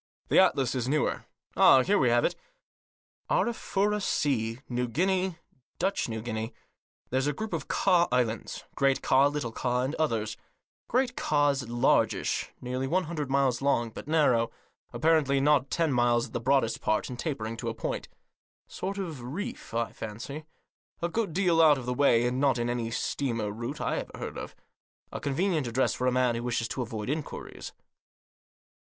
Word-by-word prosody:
The - - +5
atlas 130 -3 +3
is 125 -1 -2
newer. 150 +1 0 0.3
Ah! 130 - +7
here 205 +5 +2
we 125 - +3
have 120 0 +3
it. - - 0 0.9
Arafura 210 -3 +1
Sea 120 - 0
— - - -44
New 125 0 +1
Guinea 185 +6 0 0.2
— 130 - -45
Dutch 190 -7 0
New 110 -1 -4
Guinea. 110 -1 -4 0.6
There's 130 +2 +1
a 145 - +1
group 220 +9 -5
of - - -3
Ka 175 -3 +3
Islands 120 -3 -1
— - - -42
Great 135 -1 +2
Ka, 135 +2 +5
Little 145 -5 -3
Ka, 125 +2 -1
and 135 +3 -2
others. 110 -9 -1 0.5
Great 250 0 +1
Ka's 145 -4 +1
largish, 120 0 +1
nearly 125 +1 -3
one 185 +6 +1
hundred 155 -4 -4
miles 135 -3 +2
long, 120 -5 +1
but 115 - -9
narrow; 145 -8 +3 0.4
apparently 155 -4 +2
not 140 -1 +3
ten 165 -4 +1
miles 120 -1 +3
at - - -14
the - - -1
broadest 125 -1 +1
part, 110 - 0
and 125 -1 -7
tapering 115 -8 -3
to - - -3
a - - -5
point. - - -3 0.6
Sort 195 +2 -5
of 165 -9 -5
reef, 200 - -6
I 115 0 -1
fancy. 125 +8 -7 0.6
A 170 - +1
good 220 0 -1
deal 175 -1 +3
out 155 -3 +6
of 130 - -6
the 125 - -1
way, 125 -3 +4
and 125 +1 0
not 135 -3 +3
in 120 0 -1
any 120 -2 -2
steamer 115 -2 -2
route 115 +3 -5
I - - -1
ever - - -6
heard - - -6
of. - - -8 0.6
A - - -5
convenient 155 0 0
address 125 +3 +1
for 125 - -1
a - - +3
man 125 -1 +2
who 115 - -3
wishes 120 -2 -1
to 130 - -3
avoid 110 -3 -4
inquiries." 150 +2 -5
135 Hz, 180 wpm, -28 LUFS, 120-155 Hz, 0.9 s, Ah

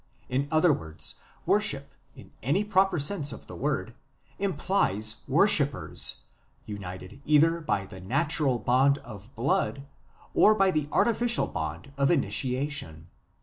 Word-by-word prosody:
In 135 +3 0
other 160 +1 +4
words, 80 - -5 0.3
worship - - 0 0.2
in - - -14
any 150 - +1
proper 195 -3 +2
sense 145 -1 0
of 115 - -9
the - - -10
word - - -2 0.5
implies 170 - 0
worshippers, 145 -2 +1 0.4
united 95 +3 -8
either 160 +3 +4
by 100 -11 -1
the 95 - -11
natural 140 - 0
bond 130 +4 +3
of 105 +1 -11
blood 135 +3 0 0.5
or 215 - +6
by 195 -2 +3
the 150 -3 -1
artificial 235 0 +2
bond 80 - -5
of 140 - +3
initiation. 130 - -1
140 Hz, 125 wpm, -27 LUFS, 110-165 Hz, 0.5 s, or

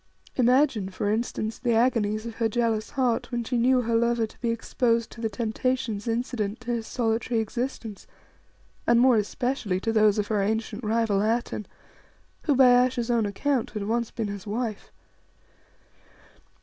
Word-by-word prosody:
Imagine, 250 -5 +3
for 200 +2 -2
instance, 220 0 -2
the 240 -3 +1
agonies 225 -3 +1
of 230 -1 -7
her 225 -1 +1
jealous 225 -1 0
heart 255 -4 0
when 240 -1 -1
she 245 +2 -3
knew 250 +2 +3
her 230 -1 -2
lover 235 0 +2
to 215 - -16
be 235 - 0
exposed 230 0 0
to 230 - -10
the 225 - 0
temptations 225 0 -2
incident 230 -2 -2
to 240 - -4
his 230 -2 -2
solitary 230 0 0
existence, 225 -1 -4 0.8
and 235 - +5
more 250 -1 +5
especially 215 -2 -1
to 225 +1 -1
those 215 -2 +4
of 210 - +1
her 210 -2 +1
ancient 220 +2 -2
rival 215 -2 +1
Atene, 220 -1 -1 0.8
who, 290 - +3
by 250 -1 +6
Ayesha's 245 -1 -1
own 230 -3 +2
account, 250 +4 -1
had 210 -1 -5
once 235 +1 -1
been 225 -3 -3
his 200 0 -7
wife. 220 0 -4
230 Hz, 160 wpm, -26 LUFS, 215-245 Hz, 0.8 s, by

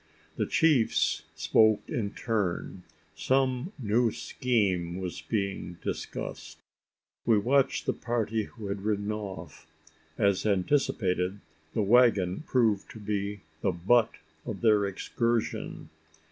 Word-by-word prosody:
The - - -1
chiefs 125 - +2
spoke 110 +7 +4
in 105 -4 -3
turn. 100 -4 -2 0.3
Some 130 +4 0
new 115 -1 +2
scheme 95 -12 0
was 90 -2 -5
being 100 -5 -3
discussed. - - -5 0.7
We 115 - +4
watched 135 +6 +2
the - - +1
party 115 -3 -1
who 110 -1 -11
had 100 0 -3
ridden 105 0 -1
off. 95 -8 -7 0.5
As 100 -2 +2
anticipated, 95 -3 +1 0.4
the 110 - +2
waggon 100 -5 +4
proved 110 -6 +2
to 110 - -10
be 100 -1 -3 0.2
the - - +2
butt 105 +7 +2 0.3
of 100 - -6
their 105 -3 +4
excursion. 115 +4 -2
105 Hz, 115 wpm, -28 LUFS, 95-120 Hz, 0.7 s, spoke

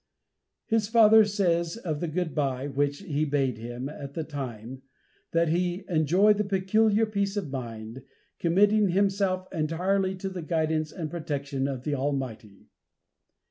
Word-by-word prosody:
His 225 -2 +1
father 220 -1 +7
says 175 -3 0
of 160 -10 -3
the 170 - -2
"good 165 -1 -2
bye" 135 -3 -1
which 145 +2 -1
he 155 -5 -1
bade 135 -6 0
him, 120 +3 -5
at 140 -1 -8
the 160 - -2
time, 130 -4 -7 0.5
that 165 -1 +2
"he 175 +3 0
enjoyed 190 +6 +3
peculiar 210 +3 +3
peace 200 -1 -2
of 170 -9 -3
mind, 115 -2 -6 0.4
committing 205 +4 +3
himself 190 0 +1
entirely 185 +5 0
to 190 +1 -4
the 185 -2 -6
guidance 155 -1 -1
and 160 -4 -5
protection 140 -5 -3
of 130 -3 -4
the 150 - -2
Almighty." 130 -7 -4
165 Hz, 140 wpm, -27 LUFS, 140-195 Hz, 0.5 s, father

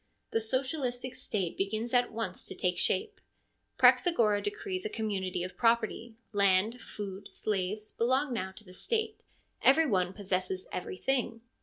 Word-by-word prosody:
The 225 - +1
socialistic 255 +1 -2
State 190 -5 -3
begins 215 +5 -2
at 245 0 +3
once 220 -5 -3
to - - -3
take 180 -1 0
shape. 185 - 0 0.6
Praxagora 230 - +5
decrees 405 -3 -3
a 430 - -2
community 195 - -2
of 185 - -6
property 230 0 +1
— - - -43
land, 200 +4 +3
food, 200 -2 -7
slaves, 210 +1 -2
belong 260 +3 +1
now 190 -5 -2
to 215 - -12
the 185 -3 -14
State 440 - -1 0.2
— - - -44
every 320 +4 +3
one 185 -8 +1
possesses 185 -2 -2
everything. 230 +6 -1
220 Hz, 150 wpm, -31 LUFS, 190-250 Hz, 0.6 s, Praxagora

